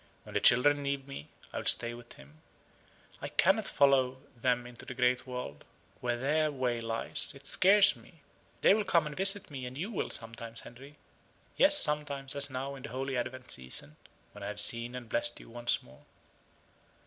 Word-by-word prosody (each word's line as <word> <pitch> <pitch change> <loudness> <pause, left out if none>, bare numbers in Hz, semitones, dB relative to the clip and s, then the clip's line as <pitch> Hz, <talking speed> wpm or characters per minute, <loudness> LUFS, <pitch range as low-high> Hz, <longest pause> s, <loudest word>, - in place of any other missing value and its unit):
When - - -13
the - - +1
children 145 +4 +5
leave 140 -1 -4
me, 135 - -9 0.2
I - - -3
will - - -8
stay 115 0 +3
with 120 0 -12
him. 75 +3 -18 0.8
I - - -4
cannot - - +2
follow 130 -2 +2 0.2
them 120 0 -1
into 120 -1 -12
the 130 - -9
great 125 +1 0
world, 125 - -7 0.4
where 120 -1 -2
their 150 +4 0
way 125 -4 -2
lies 115 0 +1
it 140 0 -15
scares 195 +6 +5
me. 165 -5 -20 0.4
They - - +5
will 215 +1 0
come 170 -5 +1
and 150 -1 -7
visit 195 -2 +4
me; 135 -3 -7
and 125 +1 -9
you 190 +9 -5
will, 205 - -3
sometimes, 115 0 -5
Henry 135 +5 -14 0.6
yes, 295 +1 +5
sometimes, 145 - +1
as 140 0 +3
now, 135 +1 -5
in 135 - -10
the 140 - -8
Holy 135 +1 -4
Advent 130 +1 -5
season, 65 +3 -4 0.4
when 105 - -13
I - - -5
have 105 0 0
seen 115 +3 +3
and 125 -2 -8
blessed 120 +1 -1
you - - -15
once 120 0 -2
more." 65 +1 -19
130 Hz, 190 wpm, -30 LUFS, 120-145 Hz, 0.8 s, children